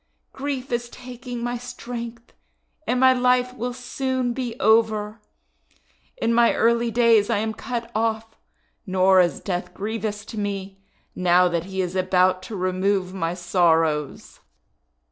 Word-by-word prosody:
Grief 270 -2 -4
is 240 0 -2
taking 245 -1 -8
my 240 0 -2
strength, 235 -1 -8 0.5
and 250 +1 +1
my 260 0 +6
life 250 0 +2
will 245 0 -4
soon 255 0 -2
be 245 -1 -5
over! 220 -1 +2 1.0
In 230 - 0
my 235 0 +4
early 235 +1 +2
days 230 -3 +4
am 215 +2 0
I - - -4
cut 235 +1 -5
off, 225 0 -1 0.5
nor 185 0 +5
is 175 -1 0
Death 180 -2 -4
grievous 215 0 -4
to 220 - -7
me, 195 -1 -4 0.3
now 180 0 +4
that 170 -1 -2
he 190 0 -3
is 180 0 -3
about 185 0 +2
to 220 - -5
remove 185 0 0
my 170 -2 -2
sorrows!' 165 -5 0
220 Hz, 140 wpm, -23 LUFS, 185-240 Hz, 1.0 s, my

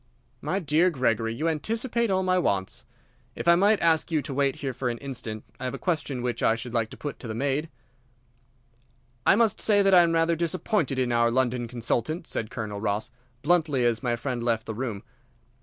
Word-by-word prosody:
"My 190 - -1
dear 165 0 +3
Gregory, 115 -6 0
you 155 +6 -1
anticipate 225 - 0
all 190 -1 +1
my 185 0 +2
wants. 95 - -1 0.5
If - - -5
I 170 - +8
might 200 +4 +4
ask 165 0 +2
you 155 -3 +1
to 140 - -5
wait 140 0 +1
here 135 -2 -4
for 125 0 -2
an 120 - -3
instant, 115 -5 -6 0.2
I - - -5
have 130 +1 -3
a - - -5
question 145 -8 -2
which 120 -2 -2
I 115 - +3
should 115 +1 -7
like 115 -2 0
to - - -11
put 145 - -6
to 125 - -8
the 110 - -4
maid." 140 +5 -1 1.6
"I - - +7
must 225 0 +2
say 205 -2 +4
that 195 -1 +4
I 180 - +9
am 170 -1 +2
rather 165 0 +2
disappointed 170 - -1
in 125 -2 0
our 120 0 +3
London 125 -1 0
consultant," 120 +7 -2
said 110 -8 -3
Colonel 105 -4 -5
Ross, 105 +1 -1 0.3
bluntly, 150 -5 +2
as 115 -2 +1
my 120 -2 0
friend 125 0 -3
left 115 -2 0
the 110 - -4
room. 110 -3 -4
135 Hz, 205 wpm, -26 LUFS, 115-170 Hz, 1.6 s, I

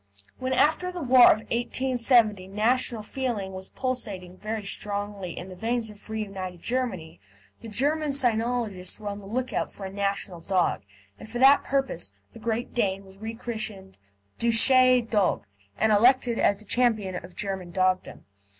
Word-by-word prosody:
When 260 0 -2
after 315 +7 +2
the 355 -3 -5
war 255 -1 +7
of 215 - +5
1870 235 -4 +2
national 220 +3 +1
feeling 215 -5 -3
was 190 0 -7
pulsating 200 -9 -4
very 215 0 -4
strongly 200 -3 -4
in 180 - -6
the 185 - -9
veins 225 +2 -2
of 210 +1 -16
reunited 195 -5 -5
Germany, 225 -9 -3 0.4
the 230 - -10
German 290 +7 +1
cynologists 230 -7 -1
were 210 -1 -5
on 200 0 -5
the 195 - -12
lookout 255 +4 -2
for 195 - -9
a 190 - -7
national 200 -2 -2
dog, 185 0 +1 0.4
and - - -11
for 240 - -4
that 270 +3 +6
purpose 265 - -2 0.2
the - - -11
Great 230 +1 -3
Dane 195 -4 -1
was 190 0 -15
re 220 +1 -5
christened 215 -5 -6 0.4
"Deutsche 250 +1 +5
Dogge," 210 -4 +1 0.3
and 220 +1 +2
elected 240 +2 +4
as 200 - +3
the 215 - -15
champion 215 -6 0
of 175 0 -13
German 190 -3 -4
Dogdom. 185 +1 -1
220 Hz, 160 wpm, -26 LUFS, 195-245 Hz, 0.4 s, war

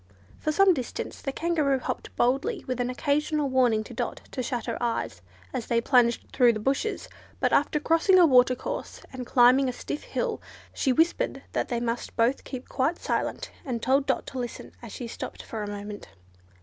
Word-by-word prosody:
For 310 - 0
some 390 +3 +5
distance 255 -7 -5
the 275 - -2
Kangaroo 305 -3 +1
hopped 255 - -4
along - - -31 0.2
boldly, 340 - -3
with 255 -1 -3
an 245 - -1
occasional 290 +2 0
warning 245 -4 +3
to - - -11
Dot - - -3
to 260 - -3
shut 245 -1 -3
her 230 0 -4
eyes 230 - -2 0.3
as 230 - -3
they 235 - +2
plunged 240 -1 +3
through 245 -3 +5
the 215 - -4
bushes; 275 - -1 0.3
but - - +1
after 295 +1 +3
crossing 330 +5 +4
a 355 - +8
watercourse, 255 - +2
and 255 -2 -6
climbing 255 +2 +5
a - - 0
stiff 290 - -5
hill, - - -3 0.3
she 265 - +1
whispered 325 +7 +1
that - - -1
they 240 -2 -1
must 235 0 -3
both 235 +4 +2
keep 255 -2 -7
quite 305 +7 0
silent, - - -2
and 245 -4 -3
told 270 +2 +2
Dot - - 0
to 260 - -6
listen 240 -1 -6
as 235 -3 -9
she 245 - -6
stopped - - -7
for 220 - -6
a 205 - -4
moment. 205 0 -7
255 Hz, 195 wpm, -27 LUFS, 235-295 Hz, 0.3 s, a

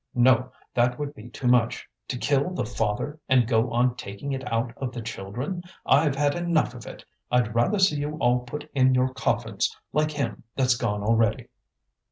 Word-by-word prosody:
No, 125 +1 +4 0.2
that 125 0 +2
would 145 -1 -4
be 120 -4 -11
too 125 - -8
much, 120 -2 +2 0.2
to 125 - -3
kill 140 +5 +1
the - - -1
father 120 +6 -2
and 125 -3 +4
go 115 0 +2
on 120 +1 +2
taking 100 +5 -6
it 130 -2 -4
out 115 +1 0
of 130 -2 -3
the 120 - -5
children! 115 - -5 0.2
I've 145 +1 +4
had 145 0 +2
enough 170 -6 +1
of 120 -3 -10
it; - - -10 0.2
I'd 120 -3 +2
rather 120 - +2
see 190 -5 +4
you 145 +1 -3
all 125 -3 +3
put 145 +4 -7
in 130 -1 +4
your 130 +1 +3
coffins, - - -1 0.2
like 155 +1 +2
him 140 -8 -3
that's 130 -2 +3
gone 105 -4 -2
already." 110 0 +1
125 Hz, 190 wpm, -26 LUFS, 115-145 Hz, 0.2 s, No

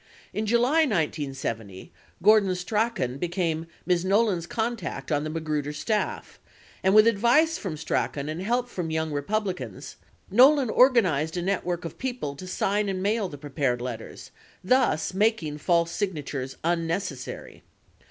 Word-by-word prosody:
40 - - -4
In 220 - -1
July, 240 +8 +3
1970, 135 - -2 0.3
Gordon 205 -2 +5
Strachan 180 - -1
became 165 -2 -1 0.2
Ms. 180 -1 +2
Nolan's 195 -3 +2
contact 225 -3 -3
on 145 -1 +1
the 155 - -3
Magruder 155 -2 -2
staff, 210 +8 -2 0.4
and 190 +2 +3
with 215 0 +8
advice 240 +9 +3
from 170 -6 -4
Strachan 145 -2 -2
and 155 +3 -4
help 240 +5 0
from 180 -8 -4
the 160 - -3
Young 160 0 -1
Republicans, 145 - -3 0.3
Nolan 260 +2 +6
organized 185 - +3
a 175 - -1
network 180 -2 -1
of 165 - -7
people 245 - -3
to 185 - -8
sign 200 +2 0
and 185 -1 -2
mail 205 -1 0
the 145 - -9
prepared 140 -3 -1
letters, 120 -2 -7 0.3
thus 215 -7 +2
making 190 -7 0
false 170 +1 +2
signa 185 -8 -2
tures 135 -1 -5
unnecessary. 165 -4 -3
180 Hz, 145 wpm, -26 LUFS, 150-215 Hz, 0.4 s, with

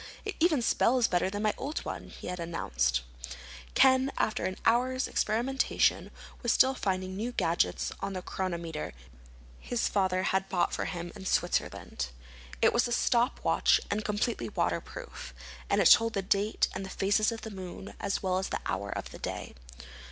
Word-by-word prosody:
"It 420 - -3
even 315 -7 +3
spells 245 0 +3
better 180 +1 +1
than 205 +2 -3
my 215 -1 +2
old 290 +4 -4
one," - - -5
he - - -11
had 180 0 -4
announced. 60 - 0 0.7
Ken, 260 +1 +5
after 215 - 0
an 185 - -2
hour's 255 +3 +2
experimentation, 245 +5 +1 0.3
was 240 - +2
still 265 +1 +5
finding 185 -5 -2
new 225 +5 -2
gadgets 175 -7 0
on 195 0 -3
the 185 -1 -5
chronometer 170 -5 -4 0.7
his 245 - -1
father 185 -2 +1
had 190 0 0
bought 175 -2 +1
for - - -1
him 175 -1 -4
in 190 -2 -7
Switzerland. 65 +1 -1 0.6
It - - +5
was 240 +1 +3
a - - -5
stop 240 0 +2
watch - - +4
and 210 +1 0
completely 210 - -1
waterproof, - - -3 0.3
and - - +3
it - - +7
told 230 0 +6
the 195 - -1
date 200 +3 +1
and 195 - -4
the 190 - -6
phases 205 +3 +2
of 225 - -6
the 220 - -7
moon 190 0 -8
as 200 0 -2
well 185 -1 +1
as 190 - -3
the - - -3
hour - - -2
of - - -5
the - - -10
day. - - -5
200 Hz, 175 wpm, -30 LUFS, 185-235 Hz, 0.7 s, it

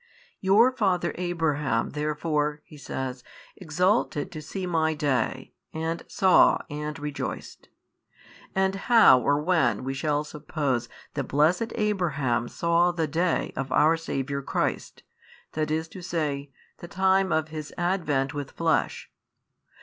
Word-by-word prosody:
Your 210 +6 +5
father 180 -6 +1
Abraham 155 -9 -1
therefore 150 0 -1
(He - - -14
says) 130 -2 -5 0.3
exulted 180 -2 0
to 155 - -7
see 185 +5 -5
My 160 -3 +1
Day 135 -6 -1 0.2
and 160 +1 -3
saw 190 -1 +5
and 150 0 -4
rejoiced. 145 -1 -6 0.9
And 190 0 +2 0.2
how 220 - +8
or 145 +3 +1
when 165 -4 +1
we 135 +1 -3
shall 145 +2 0
suppose 145 -5 -3 0.2
that 140 -2 -2
blessed 165 - +2
Abraham 145 - 0
saw 170 +4 +2
the 170 -2 -1
Day 170 +4 0
of 135 0 -4
our 155 +4 +4
Saviour 140 -4 -3
Christ, - - -3 0.5
i. 155 - -1
e., 155 -2 -3 0.3
the 175 - -9
time 190 0 +2
of 155 0 0
His 155 -1 -7
Advent 160 -7 0
with 145 -2 -5
flesh? 165 -1 -1
155 Hz, 125 wpm, -26 LUFS, 145-175 Hz, 0.9 s, how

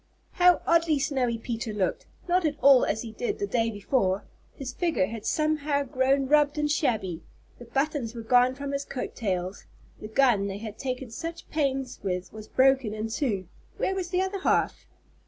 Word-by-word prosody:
How 360 -1 +4
oddly 330 -2 +3
Snowy 265 -4 0
Peter 230 -1 -4
looked, 200 -3 -2 0.2
not 360 +1 +2
at 305 -2 0
all 275 -2 +7
as 220 +3 -1
he 225 - -7
did 425 - -3
the 405 - -1
day 230 - +1
before. 205 -2 0 0.3
His 270 -2 -6
figure 325 - +1
had 225 +2 -6
somehow 305 -2 +1
grown 265 +1 +1
rubbed 295 +1 +3
and 300 0 +1
shabby. 215 - 0 0.4
The 240 - -10
buttons 270 -1 -1
were 230 - -6
gone 250 +2 +4
from 280 0 -5
his 280 0 -2
coat 265 - -5
tails. 185 -3 -3 0.3
The 215 - -7
gun 220 -4 +3
they 195 0 -4
had 215 0 -8
taken 255 -2 -4
such 330 +7 -6
pains 270 -4 -1
with 180 -2 -3
was 215 0 -9
broken 260 -4 +3
in 220 +1 -3
two. 215 - -1 0.3
_Where 380 - +1
was 370 -2 -3
the 365 +1 +1
other 385 +1 -3
half? - - 0
260 Hz, 185 wpm, -27 LUFS, 220-300 Hz, 0.4 s, all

